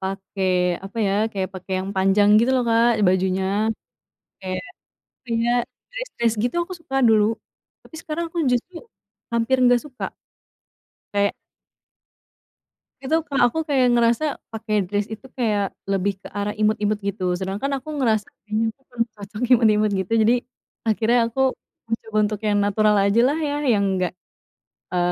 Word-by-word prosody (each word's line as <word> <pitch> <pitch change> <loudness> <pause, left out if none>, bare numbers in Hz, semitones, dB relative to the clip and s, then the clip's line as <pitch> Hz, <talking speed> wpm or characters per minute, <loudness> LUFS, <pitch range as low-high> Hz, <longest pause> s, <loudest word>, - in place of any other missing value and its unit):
pakai 190 0 -3 0.4
apa 205 +4 -7
ya, 195 - +1 0.2
kayak 190 -2 -2
pakai 185 +1 -7
yang 190 +1 -4
panjang 195 +2 +4
gitu 235 +3 +3
loh 255 - +2
Kak 230 +1 +4 0.2
bajunya. 185 +1 +1 1.0
Kayak, 185 -1 -4 0.7
iya, 230 +1 +1 0.4
dress - - -5
dress 235 -1 +2
gitu 245 - -1
aku 370 - -8
suka 270 -5 -6
dulu, 215 -1 +5 0.6
tapi 320 - -14
sekarang 325 +2 -3
aku 345 - -8
justru 250 +9 -1 0.6
hampir 235 +3 +2
nggak 245 -1 +5
suka. 270 -4 -6 1.1
Kayak 200 0 +2 1.7
itu 270 +4 +1
Kak, 280 -3 -2
aku 320 +6 -2
kayak 260 -5 +3
ngerasa 240 +6 +2 0.2
pakai 215 -2 -1
dress 205 +2 -2
itu 220 +3 -8
kayak 210 -5 0 0.2
lebih 195 0 0
ke - - -10
arah 205 0 -1
imut-imut 210 0 0
gitu. 195 -3 -2
Sedangkan 195 +8 -3
aku 305 +3 -7
ngerasa 220 -6 +1 0.2
kayaknya 215 +1 -1
aku 270 - -39
kurang 230 -1 0
cocok 210 +2 -9
imut-imut 215 -2 +3
gitu, 190 +4 -2
jadi 225 +3 +4 0.5
akhirnya 225 +2 +2
aku 265 - -1 0.5
mencoba 225 -1 -3
untuk 210 -1 -4
yang 210 -1 +2
natural 210 +1 +3
ajalah 235 +10 +3
ya, 290 -2 -1
yang 225 -7 +3
enggak 180 -2 0 0.8
e 180 - -2
215 Hz, 150 wpm, -22 LUFS, 200-245 Hz, 1.7 s, dulu